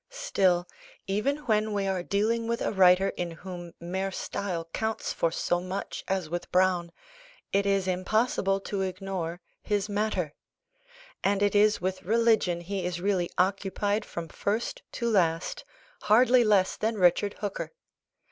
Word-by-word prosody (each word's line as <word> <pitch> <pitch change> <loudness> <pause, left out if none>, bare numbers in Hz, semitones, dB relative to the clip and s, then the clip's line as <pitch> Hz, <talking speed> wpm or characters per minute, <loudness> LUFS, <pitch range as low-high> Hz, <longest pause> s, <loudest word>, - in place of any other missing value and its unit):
Still, 195 - +1 0.4
even 275 +9 -1
when 215 -2 +1
we 200 -1 0
are 190 -2 0
dealing 220 +5 0
with 235 0 -1
a - - 0
writer 190 0 +5
in 175 -1 -3
whom 175 0 -9
mere 190 +3 -2
style 180 -3 -4
counts 220 0 -2
for 165 - +1
so 175 +1 0
much 185 +2 -5
as 190 -3 -1
with 175 +2 -5
Browne, 180 -2 +2 0.6
it 200 0 +2
is 195 -1 +1
impossible 195 +1 +1
to 200 0 -3
ignore 185 -2 -3 0.2
his 205 0 -1
matter; 200 -7 -1 0.9
and 200 +1 +2
it 205 - +2
is 210 +1 +4
with 185 +1 -2
religion 220 -4 +2
he 190 +2 -3
is 175 -1 -2
really 185 -2 0
occupied 200 +2 0
from 170 -1 -6
first 220 - -2
to 235 - -2
last, 170 -6 +1 0.4
hardly 245 +3 +5
less 205 -4 +3
than 220 +1 0
Richard 195 +2 +3
Hooker. 205 -2 -4
195 Hz, 145 wpm, -28 LUFS, 180-210 Hz, 0.9 s, writer